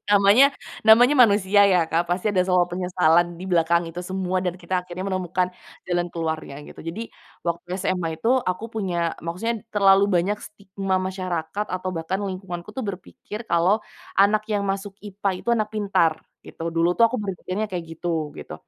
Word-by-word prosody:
Namanya 205 Hz, +6 st, +7 dB, 0.4 s
namanya 245 Hz, +6 st, +7 dB
manusia 205 Hz, -3 st, +5 dB
ya 180 Hz, -4 st, +2 dB
Kak 170 Hz, +1 st, +1 dB
pasti 180 Hz, +4 st, 0 dB
ada 200 Hz, -, -1 dB
sama 180 Hz, -1 st, +4 dB
penyesalan 175 Hz, -1 st, +2 dB
di 175 Hz, -, -9 dB
belakang 170 Hz, 0 st, +3 dB
itu 175 Hz, -, -9 dB
semua 185 Hz, 0 st, -2 dB
dan 180 Hz, -1 st, -2 dB
kita 180 Hz, 0 st, -2 dB
akhirnya 180 Hz, +1 st, -6 dB
menemukan 185 Hz, -1 st, -1 dB, 0.4 s
jalan 175 Hz, -1 st, 0 dB
keluarnya 160 Hz, -3 st, -4 dB
gitu. -, -, -15 dB
Jadi, 220 Hz, +8 st, -5 dB, 0.3 s
waktu 170 Hz, +1 st, -3 dB
SMA 185 Hz, -2 st, -1 dB
itu 230 Hz, -, +1 dB, 0.2 s
aku 200 Hz, +5 st, -2 dB
punya 175 Hz, -6 st, -2 dB
maksudnya 205 Hz, +7 st, -3 dB
terlalu 195 Hz, -1 st, +5 dB
banyak 195 Hz, +2 st, +1 dB
stigma 195 Hz, -2 st, -3 dB
masyarakat 185 Hz, 0 st, -3 dB
atau 185 Hz, 0 st, -3 dB
bahkan 185 Hz, +3 st, -3 dB
lingkunganku 185 Hz, -1 st, -5 dB
tuh 250 Hz, +2 st, -5 dB
berpikir 200 Hz, +3 st, -7 dB
kalau 180 Hz, +6 st, +3 dB, 0.3 s
anak 210 Hz, +2 st, +3 dB
yang 210 Hz, -2 st, -1 dB
masuk 195 Hz, 0 st, -3 dB
IPA 200 Hz, -1 st, -2 dB
itu -, -, -8 dB
anak 220 Hz, -3 st, +1 dB
pintar 195 Hz, -6 st, +2 dB, 0.3 s
gitu 165 Hz, 0 st, -5 dB
dulu 170 Hz, +1 st, +2 dB
tuh 230 Hz, +2 st, +4 dB
aku 255 Hz, -, -2 dB
berpikirnya 200 Hz, 0 st, -3 dB
kayak 165 Hz, -5 st, -6 dB
gitu, 165 Hz, -4 st, -2 dB
gitu. -, -, -8 dB
185 Hz, 165 wpm, -23 LUFS, 175-205 Hz, 0.4 s, Namanya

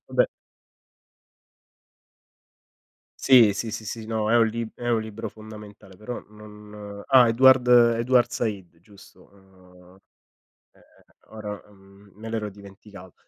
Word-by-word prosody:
vabbè -, -, +2 dB, 3.0 s
Sì, 120 Hz, -6 st, +6 dB
sì, 105 Hz, +3 st, -5 dB
sì, 110 Hz, -, -7 dB
sì. 110 Hz, +1 st, -6 dB
No, 110 Hz, -1 st, -2 dB
è -, -, +5 dB
un 115 Hz, -1 st, +4 dB
lib 115 Hz, 0 st, -5 dB
è 120 Hz, -, -6 dB
un 115 Hz, -2 st, +1 dB
libro 110 Hz, 0 st, -7 dB
fondamentale, 105 Hz, -3 st, -14 dB
però 110 Hz, +5 st, -7 dB
non 105 Hz, -1 st, -12 dB
ah, 125 Hz, -3 st, +5 dB
Edward 130 Hz, +1 st, +4 dB
Edward 120 Hz, 0 st, +4 dB
Said, 100 Hz, -8 st, -5 dB
giusto. 100 Hz, +2 st, -20 dB
Ehm, 90 Hz, -1 st, -21 dB, 0.8 s
ehm, -, -, -25 dB, 0.5 s
ora, 105 Hz, -2 st, -7 dB
uhm, 100 Hz, 0 st, -21 dB
me 110 Hz, +2 st, -10 dB
l'ero 110 Hz, -2 st, -3 dB
dimenticato. 100 Hz, -2 st, -14 dB
105 Hz, 120 wpm, -24 LUFS, 100-115 Hz, 3.0 s, Sì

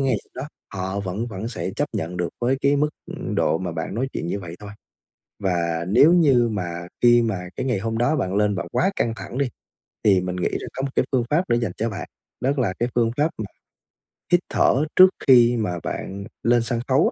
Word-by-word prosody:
ngày 135 Hz, -4 st, +2 dB, 0.2 s
đó 130 Hz, -, -5 dB, 0.3 s
họ 95 Hz, +2 st, -2 dB
vẫn 100 Hz, +4 st, -3 dB
vẫn 110 Hz, 0 st, -5 dB
sẽ 115 Hz, -, -4 dB
chấp -, -, 0 dB
nhận 85 Hz, +3 st, -3 dB
được 90 Hz, -1 st, -1 dB
với 125 Hz, +3 st, +2 dB
cái 140 Hz, +1 st, +3 dB
mức, 150 Hz, +1 st, +2 dB, 0.2 s
ừm, -, -, -5 dB
độ 80 Hz, -, +2 dB
mà 90 Hz, -1 st, -4 dB
bạn 80 Hz, +3 st, -4 dB
nói 130 Hz, +4 st, -1 dB
chuyện -, -, -3 dB
như 100 Hz, +4 st, -2 dB
vậy 85 Hz, -2 st, -8 dB
thôi. 105 Hz, -1 st, -8 dB, 0.7 s
Và 85 Hz, -3 st, 0 dB
nếu 140 Hz, -, +6 dB
như 140 Hz, -9 st, +4 dB
mà 85 Hz, -4 st, -4 dB
khi 120 Hz, 0 st, +6 dB
mà 95 Hz, -6 st, -2 dB
cái -, -, -3 dB
ngày 125 Hz, -6 st, 0 dB
hôm 115 Hz, +2 st, -2 dB
đó 120 Hz, +6 st, +2 dB
bạn 95 Hz, -9 st, -1 dB
lên 105 Hz, 0 st, +2 dB
bạn 95 Hz, -, -4 dB
quá 190 Hz, -, +2 dB
căng 115 Hz, -, 0 dB
thẳng 120 Hz, -, -7 dB
đi, 140 Hz, -, +1 dB, 0.6 s
thì 95 Hz, -3 st, +5 dB
mình 90 Hz, 0 st, -3 dB
nghĩ 90 Hz, -, 0 dB
rằng -, -, -4 dB
có 135 Hz, -, -4 dB
một 135 Hz, -, -1 dB
cái -, -, +3 dB
phương 125 Hz, -3 st, +2 dB
pháp 170 Hz, +5 st, +1 dB
nữa -, -, +4 dB
dành 115 Hz, -6 st, -1 dB
cho 115 Hz, +2 st, -1 dB
bạn, 105 Hz, -, -6 dB, 0.3 s
đó 130 Hz, -, +2 dB
là 110 Hz, -8 st, +1 dB
cái 120 Hz, -, 0 dB
phương 115 Hz, -1 st, +2 dB
pháp 150 Hz, +2 st, +3 dB
mà 110 Hz, -, -3 dB, 0.9 s
hít 175 Hz, -, +6 dB
thở 140 Hz, +4 st, +3 dB
trước 185 Hz, 0 st, +10 dB, 0.2 s
khi 120 Hz, -2 st, +7 dB
mà 90 Hz, -6 st, -1 dB
bạn 100 Hz, +1 st, -5 dB, 0.2 s
lên 120 Hz, 0 st, +3 dB
sân 115 Hz, +1 st, -2 dB
khấu 140 Hz, -, +4 dB
115 Hz, 230 wpm, -23 LUFS, 95-130 Hz, 0.9 s, trước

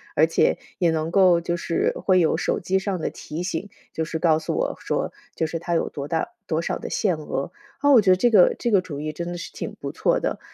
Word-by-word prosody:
而 155 Hz, +1 st, +6 dB
且 165 Hz, -, +2 dB, 0.2 s
也 175 Hz, -, +3 dB
能 160 Hz, 0 st, -1 dB
够 180 Hz, -2 st, +5 dB
就 170 Hz, 0 st, -1 dB
是 170 Hz, -, 0 dB
会 185 Hz, -1 st, +4 dB
有 165 Hz, -, +3 dB
手 -, -, -1 dB
机 190 Hz, 0 st, 0 dB
上 190 Hz, -1 st, -2 dB
的 -, -, -2 dB
提 160 Hz, +4 st, -6 dB
醒， 185 Hz, +2 st, -3 dB, 0.2 s
就 160 Hz, -, -1 dB
是 160 Hz, 0 st, -3 dB
告 160 Hz, -1 st, +3 dB
诉 160 Hz, -, -3 dB
我 -, -, -1 dB
说， -, -, -2 dB, 0.2 s
就 160 Hz, -, 0 dB
是 165 Hz, +1 st, -3 dB
它 170 Hz, +1 st, -2 dB
有 -, -, 0 dB
多 140 Hz, -1 st, -6 dB
大 160 Hz, +1 st, -1 dB, 0.2 s
多 160 Hz, -, 0 dB
少 -, -, -2 dB
的 -, -, -6 dB
限 185 Hz, -7 st, 0 dB
额。 145 Hz, -2 st, -4 dB, 0.3 s
啊， 285 Hz, -, +4 dB
我 250 Hz, -5 st, +8 dB
觉 195 Hz, -, +1 dB
得 185 Hz, -, +7 dB
这 240 Hz, +5 st, +3 dB
个 190 Hz, -5 st, +6 dB
这 235 Hz, -, -1 dB
个 195 Hz, -3 st, +5 dB
主 150 Hz, -6 st, -7 dB
意 155 Hz, +1 st, -3 dB
真 170 Hz, +2 st, -5 dB
的 175 Hz, 0 st, -4 dB
是 170 Hz, -, -7 dB
挺 -, -, -6 dB
不 -, -, -5 dB
错 -, -, +1 dB
的。 -, -, -2 dB
170 Hz, 280 characters per minute, -24 LUFS, 160-185 Hz, 0.3 s, 我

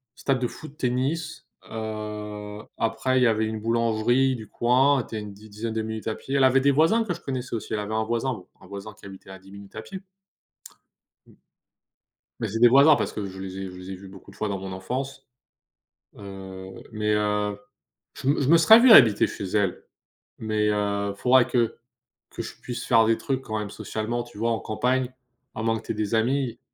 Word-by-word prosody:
stade 135 Hz, -2 st, 0 dB
de 125 Hz, -, 0 dB
foot, 150 Hz, +2 st, -11 dB
tennis, 135 Hz, +6 st, -2 dB, 0.2 s
heu, 105 Hz, -1 st, -6 dB, 0.2 s
après 115 Hz, +3 st, +1 dB
il -, -, +3 dB
y -, -, +6 dB
avait 110 Hz, -1 st, +2 dB
une 110 Hz, 0 st, -3 dB
boulangerie 115 Hz, +3 st, +2 dB
du 110 Hz, -2 st, -9 dB
coin. 130 Hz, +2 st, +3 dB
Tu 110 Hz, -, -9 dB
es -, -, -2 dB
a -, -, -6 dB
une 105 Hz, -1 st, -8 dB
di 105 Hz, +2 st, -15 dB
dizaine 110 Hz, +2 st, -5 dB
de 110 Hz, -, -1 dB
minutes 110 Hz, 0 st, -5 dB
à 110 Hz, -, -1 dB
pied. 135 Hz, -, -5 dB
Elle 135 Hz, -, +4 dB
avait 130 Hz, +1 st, +5 dB
des 140 Hz, +1 st, +4 dB
voisins 165 Hz, +11 st, +3 dB
que 185 Hz, -5 st, -2 dB
je 170 Hz, -, -10 dB
connaissais 130 Hz, -3 st, -4 dB
aussi. 110 Hz, -, -5 dB
Elle 105 Hz, -, 0 dB
avait 105 Hz, +1 st, -4 dB
un 110 Hz, 0 st, +1 dB
voisin, 120 Hz, +3 st, -1 dB
bon, 95 Hz, -5 st, -11 dB
un -, -, -15 dB
voisin 100 Hz, +2 st, -8 dB
qui -, -, -15 dB
habitait 95 Hz, 0 st, -12 dB
à 95 Hz, -, -9 dB
10 95 Hz, +1 st, -17 dB
minutes 100 Hz, +1 st, -12 dB
à 110 Hz, -, -5 dB
pied. 190 Hz, -1 st, -8 dB, 1.3 s
M -, -, -21 dB, 1.0 s
mais -, -, -1 dB
c'est 115 Hz, +3 st, -3 dB
des 120 Hz, -, +8 dB
voisins 140 Hz, +5 st, +7 dB
parce -, -, -2 dB
que 105 Hz, -, -4 dB
je 95 Hz, 0 st, -10 dB
les 95 Hz, 0 st, -6 dB
ai 95 Hz, -, -4 dB
je 90 Hz, -, -11 dB
les 90 Hz, +1 st, -8 dB
ai -, -, -5 dB
vus 95 Hz, +1 st, -12 dB
beaucoup 95 Hz, -1 st, -14 dB
de -, -, -18 dB
fois 110 Hz, -, -2 dB
dans 100 Hz, -, -2 dB
mon 95 Hz, 0 st, -7 dB
enfance. 130 Hz, +9 st, -5 dB, 0.9 s
Heu, 95 Hz, -1 st, -9 dB, 0.2 s
mais 105 Hz, -1 st, 0 dB
heu, 105 Hz, -1 st, 0 dB, 0.6 s
je 130 Hz, -, -6 dB
m 145 Hz, -, +3 dB
je 135 Hz, -, 0 dB
me 170 Hz, -, +8 dB
serais 220 Hz, +7 st, +8 dB
vu 245 Hz, -1 st, +7 dB
habiter 110 Hz, -, +8 dB
chez -, -, -7 dB
elle 95 Hz, -1 st, -1 dB, 0.6 s
mais 110 Hz, -1 st, 0 dB
heu, 100 Hz, -1 st, -1 dB
faudrait 125 Hz, +2 st, +4 dB
que 120 Hz, -3 st, +1 dB, 0.6 s
que -, -, -5 dB
je -, -, -8 dB
puisse 120 Hz, -1 st, -5 dB
faire 115 Hz, -2 st, +5 dB
des 115 Hz, 0 st, +2 dB
trucs, 135 Hz, -1 st, -2 dB
quand 110 Hz, -3 st, -4 dB
même, 105 Hz, -1 st, -4 dB
socialement, 115 Hz, +3 st, -3 dB
tu 120 Hz, -4 st, -15 dB
vois? 115 Hz, +2 st, 0 dB
En 115 Hz, -, 0 dB
campagne, 125 Hz, +4 st, -1 dB, 0.4 s
à 110 Hz, -, -4 dB
moins 115 Hz, 0 st, +1 dB
que -, -, -16 dB
tu -, -, -1 dB
aies -, -, -10 dB
des 105 Hz, +1 st, -1 dB
amis, 125 Hz, +1 st, 0 dB
110 Hz, 225 wpm, -25 LUFS, 105-130 Hz, 1.3 s, des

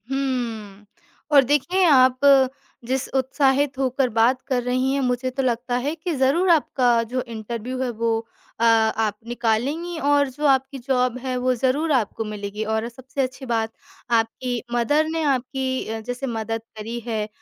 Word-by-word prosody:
हम्म, 235 Hz, -7 st, -3 dB, 0.5 s
और 280 Hz, -2 st, +7 dB
देखें 295 Hz, +8 st, +1 dB
आप 260 Hz, -5 st, +5 dB, 0.7 s
जिस 260 Hz, +2 st, -1 dB
उत्साहित 270 Hz, +1 st, +1 dB
होकर 260 Hz, 0 st, +1 dB
बात 235 Hz, +3 st, +2 dB
कर 255 Hz, -3 st, 0 dB
रही 255 Hz, +2 st, 0 dB
हैं, 280 Hz, -, 0 dB
मुझे 250 Hz, 0 st, 0 dB
तो 265 Hz, +1 st, -2 dB
लगता 245 Hz, 0 st, -1 dB
है 295 Hz, -, 0 dB
कि 345 Hz, 0 st, -4 dB
ज़रूर 280 Hz, +8 st, +2 dB
आपका 255 Hz, -7 st, +3 dB
जो 255 Hz, -, +1 dB
इंटरव्यू 235 Hz, +2 st, -5 dB
है 255 Hz, -, -1 dB
वो 230 Hz, -1 st, 0 dB, 0.4 s
अ, -, -, +2 dB
आप 220 Hz, -2 st, +3 dB
निकालेंगी 255 Hz, +9 st, -1 dB
और 285 Hz, -1 st, +2 dB
जो 295 Hz, +4 st, -5 dB
आपकी 270 Hz, 0 st, +2 dB
जॉब 250 Hz, -1 st, 0 dB
है, 255 Hz, 0 st, -3 dB
वो 255 Hz, +1 st, +1 dB
ज़रूर 270 Hz, +6 st, 0 dB
आपको 225 Hz, -4 st, 0 dB
मिलेगी। 210 Hz, 0 st, -5 dB
और 220 Hz, +1 st, -1 dB
सबसे 260 Hz, +3 st, -5 dB
अच्छी 260 Hz, +1 st, -4 dB
बात 225 Hz, -2 st, -1 dB, 0.5 s
आपकी 235 Hz, +2 st, -2 dB
मदर 290 Hz, +6 st, +2 dB
ने 325 Hz, 0 st, -2 dB
आपकी 260 Hz, 0 st, -1 dB
अ, 225 Hz, 0 st, -3 dB
जैसे 245 Hz, +4 st, -5 dB
मदद 225 Hz, -1 st, -3 dB, 0.2 s
करी 225 Hz, +3 st, -5 dB
है 215 Hz, -2 st, -2 dB
255 Hz, 160 wpm, -23 LUFS, 230-270 Hz, 0.7 s, और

